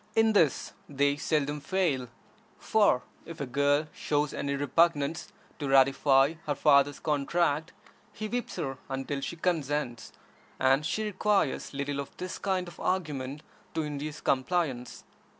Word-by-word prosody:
In 225 0 +4
this 165 -9 +2 0.2
they 140 0 +2
seldom 150 0 -1
fail; 150 -7 0 0.5
for 205 - +3 0.2
if 165 -1 -10
a 140 - -2
girl 145 +3 +2
shows 145 -1 -1
any 140 0 -2
repugnance 145 +2 +1 0.3
to 145 -2 -3
ratify 135 +1 +5
her 145 - 0
father's 140 0 +4
contract, 155 +2 0 0.4
he 215 +1 -5
whips 245 +2 -3
her 135 -2 -4
until 135 +1 -3
she 170 - -4
consents, 150 -7 -2 0.5
and 135 +3 +3
she 215 - -1
requires 205 -9 0
little 140 0 -2
of 140 - -7
this 185 0 -5
kind 185 -2 -1
of 175 - -12
argument 150 -6 -2 0.3
to 160 - 0
induce 150 0 -5
compliance. 135 -3 -1
145 Hz, 135 wpm, -29 LUFS, 140-170 Hz, 0.5 s, ratify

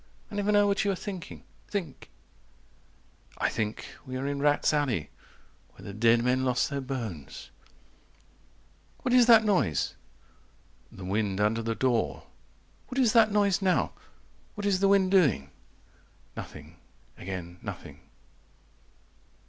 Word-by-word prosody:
"I - - -7
never 205 0 0
know 205 0 +5
what 200 0 +1
you 200 - 0
are 195 - +1
thinking. 185 -1 -7 0.2
Think." 175 -9 -5 1.3
I - - +1
think 110 -1 -3 0.2
we 130 0 -6
are 130 - -4
in 140 0 -2
rats' 145 +1 +2
alley 130 - -1 0.6
Where - - -14
the 100 - -7
dead 115 +2 +3
men 125 +1 +1
lost 125 +2 +1
their 140 0 -2
bones. 115 - -6 1.5
"What 250 - 0
is 245 -2 +6
that 225 -2 +8
noise?" 140 - +1 1.0
The 95 - -9
wind 100 0 -1
under 105 +2 +1
the 115 0 -2
door. 115 - 0 0.6
"What 255 - -7
is 245 -5 +3
that 225 -2 +5
noise 205 -2 +2
now? 185 -2 +1 0.6
What 205 -1 -5
is 195 -2 +2
the 195 - +3
wind 195 -1 +3
doing?" 130 - +3 0.8
Nothing - - -10 0.4
again 90 -1 -7
nothing. - - -8
140 Hz, 135 wpm, -28 LUFS, -, 1.5 s, that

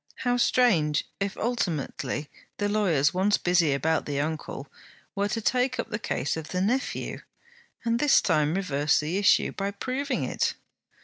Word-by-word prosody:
How 245 0 +3
strange 185 -12 +3
if 195 0 -2
ultimately 165 - -2 0.3
the 205 - 0
lawyers 175 -9 +2
once 195 +3 +2
busy 175 -4 +2
about 160 +3 0
the 140 -1 -2
uncle 150 -2 -4 0.5
were 200 0 0
to 225 +2 -2
take 255 +3 +1
up - - -3
the 210 - -2
case 150 - -2
of 160 -1 -6
the 180 - -3
nephew, 240 +8 -1 0.7
and 230 0 +1
this 295 +1 +5
time 155 -2 +1
reverse 150 -6 +1
the 160 +6 -1
issue, 205 - +4
by 195 0 -3
proving 255 +6 -2
it! - - -1
190 Hz, 160 wpm, -26 LUFS, 155-230 Hz, 0.7 s, this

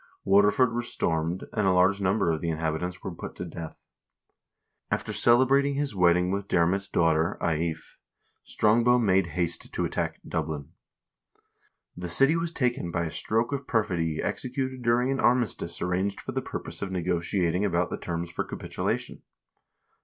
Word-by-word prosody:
Waterford 105 +5 +4
was 120 0 -2
stormed, 80 +2 -1
and 105 -3 +1
a - - +5
large 95 +2 +3
number 95 -2 +2
of 80 - -2
the 85 - -1
in 80 - -1
habitants 80 +3 -3
were 95 - -4
put - - -8
to 90 - -5
death. 80 -1 -9 1.0
After - - -2
celebrating 135 +4 +4
his 145 -3 -1
wedding 90 0 +3
with 100 0 -2
Diarmait's 95 +3 +1
daughter, 80 +2 +2
Aife, 80 0 -2 0.4
Strongbow 120 +3 +3
made 95 -6 +3
haste 85 -1 -2
to - - -1
attack - - -2
Dublin. 75 -3 -3 1.2
The 90 0 -5
city 135 - +5
was 165 0 -1
taken 125 - -1
by 85 0 -1
a 80 - -4
stroke 115 - -1
of 140 -1 -4
perfidy 85 -8 0
executed 130 0 -3
during 120 +2 +2
an 135 - -1
armi 120 0 +4
stice 85 -5 -5
arranged 95 +3 -1
for - - -6
the - - -2
purpose - - -6
of 95 - -3
negotiating 90 +1 0
about 90 -3 0
the - - -4
terms 85 0 -4
for - - -2
capitulation. - - -4
95 Hz, 160 wpm, -27 LUFS, 85-120 Hz, 1.2 s, a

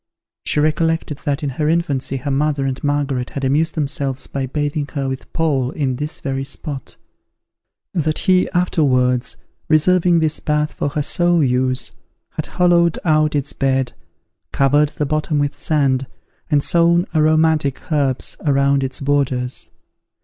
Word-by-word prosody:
She - - +1
recollected 155 -1 0
that 145 +1 -1
in 145 - 0
her 150 +4 -1
infancy 140 -5 0
her 140 +2 -3
mother 140 0 0
and 135 -1 -3
Margaret 140 -3 -1
had 140 - -6
amused 150 +5 +1
themselves 140 -3 -2
by 135 -1 -3
bathing 145 +1 -2
her 140 -3 -2
with 130 0 -5
Paul 140 -6 0
in 130 -3 -2
this 150 +2 -4
very 135 -1 -2
spot; 140 -1 -6 1.0
that 155 -2 0
he 185 -1 +2
afterwards, 130 -8 +1 0.3
reserving 175 +2 +4
this 160 -1 +1
bath 150 0 0
for - - -2
her 150 +1 -2
sole 175 +1 +2
use, 130 0 +1 0.4
had - - -4
hollowed 175 -2 +3
out 155 -2 +3
its 145 -1 -1
bed, 135 -1 0 0.6
covered 145 +2 +3
the 150 - -3
bottom 155 +1 -1
with 145 0 0
sand, 135 -4 0 0.4
and 145 -2 +2
sown 170 +1 +3
aromatic 155 -1 +2
herbs 140 -4 0
around 140 -1 +2
its 135 +1 -4
borders. 135 -3 -1
145 Hz, 145 wpm, -19 LUFS, 135-155 Hz, 1.0 s, reserving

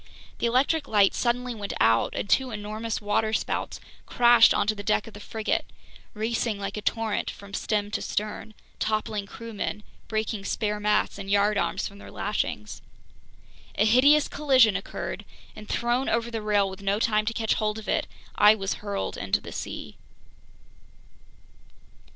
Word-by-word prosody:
The - - +1
electric 280 +5 +2
light 205 -2 +4
suddenly 245 0 0
went 205 -3 -5
out, 115 +1 +3
and - - -3
two 260 +5 +2
enormous 215 +1 -4
waterspouts 215 +1 -1 0.3
crashed 240 -1 +6
onto 205 +1 +2
the 205 - -7
deck 210 0 +1
of 225 - -11
the 205 - -10
frigate, 220 +1 -2 0.5
racing 225 0 -1
like 200 0 -4
a 210 - -4
torrent 225 0 -1
from 200 0 -11
stem 205 0 -1
to - - -2
stern, 215 +1 -4 0.2
toppling 215 -1 -1
crewmen, 210 -1 -5 0.2
breaking 215 -1 -2
spare 210 0 -1
masts 210 -1 +1
and 195 0 -7
yardarms 205 +1 +1
from 200 0 -13
their - - -11
lashings. 105 - -3 0.9
A 210 - +3
hideous 280 +7 +5
collision 260 -8 +4
occurred, 195 - -5 0.3
and 215 0 -11
thrown 240 +3 0
over 235 +1 0
the 225 -1 -3
rail 205 -2 +2
with 190 +1 -8
no 200 +1 0
time 215 -1 +2
to 230 - 0
catch 225 -1 +1
hold 215 0 -1
of 220 - -9
it, - - 0 0.3
I 210 +1 +6
was 195 -2 -2
hurled 200 -1 -3
into 100 -1 0
the - - -10
sea. - - -6
215 Hz, 155 wpm, -26 LUFS, 205-230 Hz, 0.9 s, crashed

